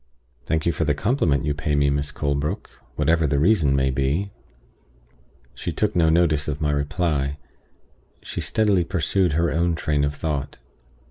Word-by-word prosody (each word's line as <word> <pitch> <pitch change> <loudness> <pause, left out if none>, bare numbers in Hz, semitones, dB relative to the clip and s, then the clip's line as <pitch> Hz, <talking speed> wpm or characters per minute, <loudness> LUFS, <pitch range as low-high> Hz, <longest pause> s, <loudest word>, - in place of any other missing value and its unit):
"Thank 80 -1 0
you 85 - +3
for 80 - -2
the 75 -2 +1
compliment 80 - +1
you 75 - 0
pay 75 0 -1
me, 70 -1 +3
Miss 70 0 -1
Colebrook, 70 0 -2 0.2
whatever 80 -1 +2
the 70 - +1
reason 80 -4 +3
may 65 -1 +2
be." 70 +10 -1 1.2
She - - -4
took 105 -1 -1
no 80 -2 +4
notice 80 -3 +2
of 75 -1 -3
my 75 -1 0
reply; 75 -1 -1 0.9
she - - -5
steadily 105 -5 +2
pursued 90 0 0
her 85 0 +1
own 85 +2 +1
train 75 -3 0
of 70 0 -1
thought. 75 -3 -3
75 Hz, 160 wpm, -23 LUFS, 70-85 Hz, 1.2 s, no